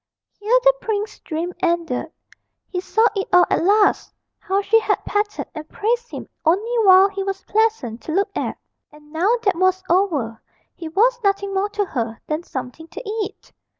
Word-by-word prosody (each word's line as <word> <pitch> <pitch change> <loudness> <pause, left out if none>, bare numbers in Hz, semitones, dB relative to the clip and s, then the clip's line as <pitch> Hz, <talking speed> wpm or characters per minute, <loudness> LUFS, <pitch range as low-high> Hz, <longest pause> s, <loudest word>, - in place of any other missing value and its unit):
Here 435 +4 +3
the - - +6
prince's 420 -1 -3
dream 335 +2 -4
ended: 340 -6 -1 0.6
he 360 - -2
saw 440 +4 +2
it 390 - -2
all 360 0 +6
at - - +2
last 410 +3 +3 0.3
how 395 0 -1
she 450 +3 +4
had 440 - -1
petted 415 0 -1
and 310 -1 -8
praised 475 +3 -1
him - - -7 0.2
only 400 +9 +1
while 380 +1 +8
he 395 0 -5
was 390 0 -4
pleasant 425 - 0
to - - -6
look 395 +4 0
at; - - -3 0.3
and 300 0 -18
now 345 +6 +1
that 395 -4 +2
was 370 +1 +2
over 300 - +1 0.3
he 330 - -8
was 470 +8 +2
nothing 395 0 0
more 390 +2 0
to 410 0 -1
her 230 -9 -4
than 305 +1 -2
something 285 0 -7
to 330 +8 -9
eat. 420 -1 -5
390 Hz, 180 wpm, -21 LUFS, 330-420 Hz, 0.6 s, while